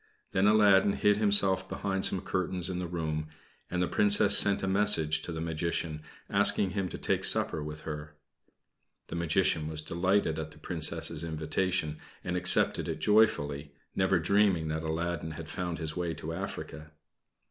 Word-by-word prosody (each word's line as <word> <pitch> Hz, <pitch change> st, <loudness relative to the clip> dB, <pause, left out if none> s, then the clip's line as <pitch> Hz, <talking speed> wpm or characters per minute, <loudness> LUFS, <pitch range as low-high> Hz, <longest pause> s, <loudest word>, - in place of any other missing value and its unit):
Then 95 Hz, +2 st, +2 dB
Aladdin 100 Hz, -2 st, +5 dB
hid 105 Hz, 0 st, +2 dB
himself 100 Hz, -3 st, +2 dB
behind 95 Hz, -1 st, -1 dB
some 95 Hz, -, 0 dB
curtains 95 Hz, -1 st, -2 dB
in 90 Hz, -, -4 dB
the 90 Hz, -, -4 dB
room, 80 Hz, -3 st, -3 dB, 0.4 s
and 90 Hz, 0 st, -1 dB
the -, -, 0 dB
Princess 105 Hz, -1 st, +4 dB
sent 100 Hz, -1 st, +4 dB
a -, -, -1 dB
message 95 Hz, -6 st, +2 dB
to -, -, -6 dB
the 80 Hz, -, -5 dB
Magician 80 Hz, -1 st, -3 dB, 0.3 s
asking 95 Hz, -, +3 dB
him 95 Hz, -1 st, -2 dB
to -, -, -7 dB
take -, -, -1 dB
supper 75 Hz, -, +2 dB
with 75 Hz, 0 st, -7 dB
her. 75 Hz, -1 st, -7 dB, 0.9 s
The -, -, -5 dB
Magician 80 Hz, -2 st, +1 dB
was 80 Hz, -1 st, -3 dB
delighted 85 Hz, 0 st, 0 dB
at 80 Hz, -1 st, -5 dB
the 75 Hz, -, -15 dB
Princess's 80 Hz, -1 st, -3 dB
invitation, 80 Hz, 0 st, -2 dB, 0.2 s
and 90 Hz, -, -3 dB
accepted 90 Hz, 0 st, +2 dB
it 80 Hz, -, -3 dB
joyfully, 75 Hz, -8 st, +1 dB, 0.2 s
never 95 Hz, 0 st, +2 dB
dreaming 90 Hz, -2 st, +2 dB
that 80 Hz, +1 st, -2 dB
Aladdin 80 Hz, 0 st, -3 dB
had 80 Hz, -, -8 dB
found 85 Hz, 0 st, -4 dB
his 80 Hz, -1 st, -5 dB
way 85 Hz, -2 st, -3 dB
to 80 Hz, +2 st, -6 dB
Africa. 80 Hz, -4 st, -7 dB
85 Hz, 165 wpm, -29 LUFS, 80-95 Hz, 0.9 s, Aladdin